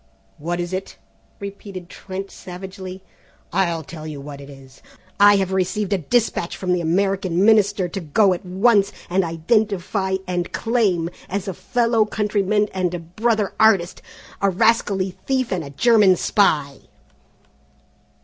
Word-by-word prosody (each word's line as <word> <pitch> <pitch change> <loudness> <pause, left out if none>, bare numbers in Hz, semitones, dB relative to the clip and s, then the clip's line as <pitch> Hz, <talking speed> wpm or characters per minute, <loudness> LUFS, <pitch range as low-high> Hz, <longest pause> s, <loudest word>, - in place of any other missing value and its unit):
"What 175 +3 -3
is 175 +1 -4
it?" 190 +1 -5 0.4
repeated 200 -2 -8
Trent 195 +2 -7
savagely; 185 +1 -9 0.5
"I'll 170 -3 0
tell 155 +1 -9
you 150 -2 -6
what 140 0 -9
it 140 - -11
is. 135 -1 -15 0.4
I 205 0 +7
have 190 -1 0
received 190 +2 0
a 195 - +1
dispatch 210 - 0
from 180 -1 -1
the 180 - 0
American 185 +1 +1
Minister 205 -4 +4
to 195 - -4
go 190 +4 +3
at 175 - -6
once 200 +2 +3 0.2
and 190 +1 +2
identify 190 +2 0
and 175 -1 -3
claim, 200 -8 0 0.2
as 200 +1 -3
a 190 - -2
fellow 230 +1 +1
countryman 210 -1 0
and 185 -2 0
a - - -4
brother 210 +5 -1
artist, 200 -5 +3 0.4
a 200 - +3
rascally 195 -2 +2 0.2
thief 260 -2 0
and 180 -3 -1
a 140 - -8
German 205 - +4
spy!" 150 -8 +1
190 Hz, 145 wpm, -21 LUFS, 175-205 Hz, 0.5 s, I